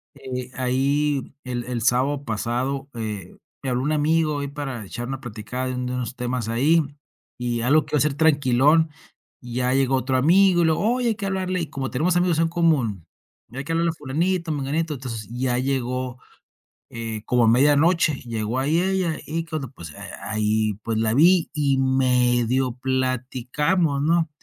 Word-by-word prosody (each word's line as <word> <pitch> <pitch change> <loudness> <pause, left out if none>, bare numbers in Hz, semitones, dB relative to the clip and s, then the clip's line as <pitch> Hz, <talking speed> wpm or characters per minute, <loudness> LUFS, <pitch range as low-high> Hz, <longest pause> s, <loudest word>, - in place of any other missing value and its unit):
Eh, 130 -2 -6
ahí 135 +3 0
el 125 -2 -4
el 120 -2 -3
sábado 130 +4 +1
pasado, 125 +5 -2
eh, 105 -5 -5 0.2
me 135 - -3
habló 125 +1 0
un 150 - 0
amigo 155 0 +1
ahí 140 - -3
para 135 -5 -5
echar 120 +5 -6
una 135 0 -5
platicada 120 +2 -5
de 130 - -3
un 125 0 -3
de 125 - -3
unos 125 0 -3
temas 125 -2 -3
ahí, 150 +8 +3 0.6
y 120 -1 -2
algo 145 +5 +3
que 145 - -13
iba - - +3
a - - +2
ser 145 -1 +1
tranquilón. 150 +1 +4 0.5
Ya 125 +1 -1
llegó 135 -1 +2
otro 130 0 0
amigo, 175 +5 +5
y - - +3
luego: 160 +8 +2
"Oye, 245 -2 0
hay 220 - 0
que 200 -1 -4
hablarle", 185 -2 -1
y 160 - -3
como 135 -3 -4
tenemos 165 +8 +1
amigos 175 -2 +2
en 165 - +3
común, 150 - +1 0.5
"hay 135 +2 -4
que 165 +4 -3
hablarle 170 +1 +2
a - - -9
fulanito, 165 +4 -1
a - - +1
menganito". 150 +3 -1
Entonces, 115 -5 -6
ya 125 0 -1
llegó, 130 -1 -2 0.7
eh, 115 -2 -5
como 125 -2 +2
a 110 - +5
media 140 +5 +5
noche 165 0 +3
llegó 115 +1 -2
ahí 155 +6 +2
ella, 185 -4 0
y 165 +2 -2
cuando, 155 -6 -5
pues 85 - -10
a - - -8
ahí, 110 0 +1
pues, 115 -1 -1
la 110 0 +1
vi 170 +4 +5
y 140 -3 +1
medio 125 -1 +2
platicamos, 130 +5 0
¿no? 165 +1 +2
135 Hz, 185 wpm, -23 LUFS, 125-155 Hz, 0.7 s, amigo